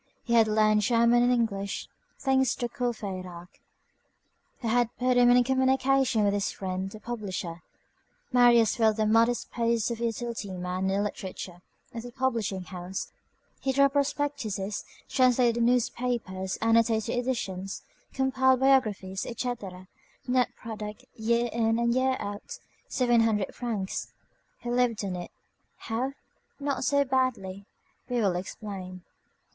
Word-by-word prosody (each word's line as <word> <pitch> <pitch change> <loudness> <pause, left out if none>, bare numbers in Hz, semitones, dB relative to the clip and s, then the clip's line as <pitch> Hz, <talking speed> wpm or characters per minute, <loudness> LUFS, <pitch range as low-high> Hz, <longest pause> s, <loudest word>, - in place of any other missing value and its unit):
He 235 - -2
had 225 -2 +6
learned 215 0 +3
German 235 +2 +4
and 245 +1 +4
English; 200 -5 -1 0.3
thanks 265 -2 +2
to 240 - -2
Courfeyrac, 190 -8 -5 1.0
who 235 - -3
had 240 0 +2
put 250 0 +2
him 245 0 +6
in 245 0 +6
communication 265 -2 +2
with 200 -1 +2
his 205 0 0
friend 190 0 -4
the 215 - -10
publisher, 190 -7 -5 0.7
Marius 240 -3 +5
filled 220 -2 +3
the 215 - +2
modest 230 +2 +2
post 235 -1 0
of 230 - -4
utility 230 -3 -3
man 180 +1 -2
in 195 - +1
the 205 - +1
literature 185 -3 -6 0.3
of 230 - -5
the 245 +1 -9
publishing 230 -7 -1
house. 180 +1 -6 0.5
He 270 - 0
drew 275 +1 +4
up 275 - +1
prospectuses, 275 -8 -1 0.2
translated 245 -2 +3
newspapers, 235 -5 0
annotated 225 0 +3
editions, 195 -7 -3 0.3
compiled 260 -1 +2
biographies, 215 -8 +2
etc.; 205 -7 -5 0.4
net 250 -1 +2
product, 215 -2 -7
year 235 +1 +1
in 225 -1 +2
and 235 0 +2
year 260 +1 +2
out, 205 0 -6 0.3
seven 240 -3 +3
hundred 215 -3 +1
francs. 215 -6 -3 0.5
He 240 - -4
lived 240 -4 +1
on 185 -2 -3
it. 175 -1 -6 0.5
How? 245 +5 -3 0.5
Not 280 -2 -2
so 280 -1 +3
badly. 235 -7 -1 0.4
We 245 - -2
will 195 -5 +2
explain. 185 -1 -6
230 Hz, 135 wpm, -28 LUFS, 200-245 Hz, 1.0 s, had